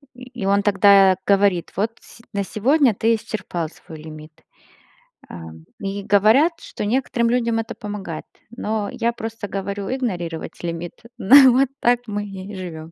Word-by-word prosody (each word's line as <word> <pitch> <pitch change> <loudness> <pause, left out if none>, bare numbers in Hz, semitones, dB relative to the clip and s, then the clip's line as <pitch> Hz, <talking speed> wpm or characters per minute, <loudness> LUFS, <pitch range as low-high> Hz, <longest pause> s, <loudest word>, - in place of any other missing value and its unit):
И 250 - -12 0.2
и - - -1
он 200 +1 +2
тогда 195 -1 +5
говорит: 195 -3 +2
"Вот 210 +4 0
с - - -16
на 200 -1 -1
сегодня 250 - +2
ты 225 +3 +2
исчерпал 185 -7 -5
свой 160 -1 -13
лимит". 155 0 -12 0.9
А 85 - -9 0.4
и 200 0 -4
говорят, 220 - +4
что - - -6
некоторым 235 0 0
людям 235 -2 +1
это 225 - -5
помогает, 200 -6 -6 0.3
но 215 -3 -2
я 235 - -1
просто 225 -2 -6
говорю: 195 0 -4
"Игнорировать 175 -14 -4
лимит". 170 0 -4 0.2
На 260 +4 +8
вот 260 +2 +3
так 240 0 +3
мы 205 -1 -3
и 195 0 -9
живём. 165 -4 -8
205 Hz, 155 wpm, -21 LUFS, 185-230 Hz, 0.9 s, На